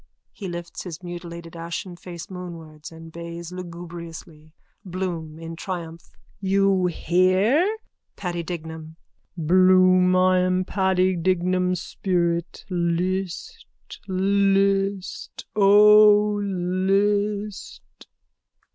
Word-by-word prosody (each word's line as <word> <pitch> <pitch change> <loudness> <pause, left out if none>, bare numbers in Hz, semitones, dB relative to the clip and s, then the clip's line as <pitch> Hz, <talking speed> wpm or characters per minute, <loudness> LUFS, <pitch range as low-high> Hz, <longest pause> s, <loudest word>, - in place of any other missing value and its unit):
(He 200 - -8
lifts 175 -1 -6
his 175 -1 -8
mutilated 170 -1 -8
ashen 170 +2 -5
face 175 -1 -9
moonwards 165 -5 -9
and 165 0 -12
bays 170 +1 -8
lugubriously.) 170 -3 -9 0.3
BLOOM: 175 -4 -4
(In 165 0 -7
triumph.) 170 -2 -6 0.3
You 195 -1 +2
hear? 190 - +2 0.4
PADDY 175 -2 -3
DIGNAM: 160 -2 -7 0.4
Bloom, 185 +2 +5
I 185 0 +4
am 185 0 +1
Paddy 190 -1 +1
Dignam's 180 +1 0
spirit. 170 -3 -2
List, 180 - -2 0.4
list, 195 0 0
O 210 +1 +6
list! 200 +2 -1
180 Hz, 85 wpm, -23 LUFS, 170-195 Hz, 0.4 s, O